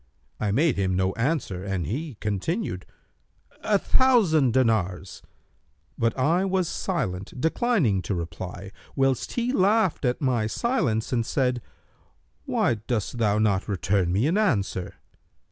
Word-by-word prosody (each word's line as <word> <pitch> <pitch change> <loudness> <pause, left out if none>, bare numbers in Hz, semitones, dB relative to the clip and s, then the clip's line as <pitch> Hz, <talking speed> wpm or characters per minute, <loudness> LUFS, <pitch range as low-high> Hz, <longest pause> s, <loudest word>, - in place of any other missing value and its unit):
I 105 - 0
made 145 +3 +2
him 95 -2 0
no 95 +1 +1
answer, 115 - -1
and 95 -4 -2
he 135 - -4
continued, 105 - -3 0.8
'A 210 -2 +3
thousand 195 - +3
dinars.' 110 -7 0 0.7
But 115 +2 0
I 160 +8 +2
was 190 -2 0
silent, 125 - -3
declining 160 - +1
to 90 +2 -3
reply, 90 +3 -6 0.2
whilst 135 -2 0
he 245 +1 -1
laughed 200 - +2
at 125 -1 0
my 125 -6 +1
silence 115 - -1
and 115 -2 +2
said, 125 0 0 0.8
'Why 115 - +1
dost 120 0 -2
thou 105 -2 +2
not 105 -3 +1
return 95 -2 0
me 100 +7 +2
an 175 +8 +2
answer?' 100 - 0
120 Hz, 130 wpm, -25 LUFS, 100-165 Hz, 0.8 s, A